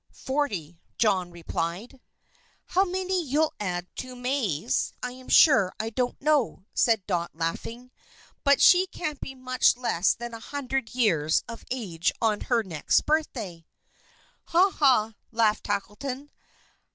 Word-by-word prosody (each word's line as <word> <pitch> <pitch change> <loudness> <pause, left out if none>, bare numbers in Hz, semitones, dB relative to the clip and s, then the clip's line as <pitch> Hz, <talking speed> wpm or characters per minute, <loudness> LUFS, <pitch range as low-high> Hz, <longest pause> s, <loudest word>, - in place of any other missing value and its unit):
"Forty," 200 - -2 0.2
John 190 -5 +2
replied. 175 +8 -5 0.6
"How 375 - +2
many 370 -1 -1
you'll 305 +2 +1
add 180 -3 -2
to 255 -1 -6
May's 245 - -1
I 250 - -2
am 255 0 -13
sure 205 - +6
I 225 +1 -3
don't 250 +1 -2
know," 280 -10 +1
said 225 -5 +2
Dot, 175 -3 -1
laughing. 230 +10 -4 0.5
"But 280 -1 +4
she 370 +1 +7
can't 305 -5 -5
be 270 - -6
much 255 -1 +2
less 215 -7 +1
than 240 0 -7
a 230 - -7
hundred 265 -1 -4
years 165 -11 +2
of 230 -1 -9
age 190 -10 -1
on 215 -2 +1
her 235 -3 +1
next 165 -7 +1
birthday." 225 - -2 0.8
"Ha, 365 +4 +4
ha!" 250 -9 +3 0.2
laughed 220 -2 +1
Tackleton. 250 +8 -4
235 Hz, 135 wpm, -26 LUFS, 190-275 Hz, 0.8 s, she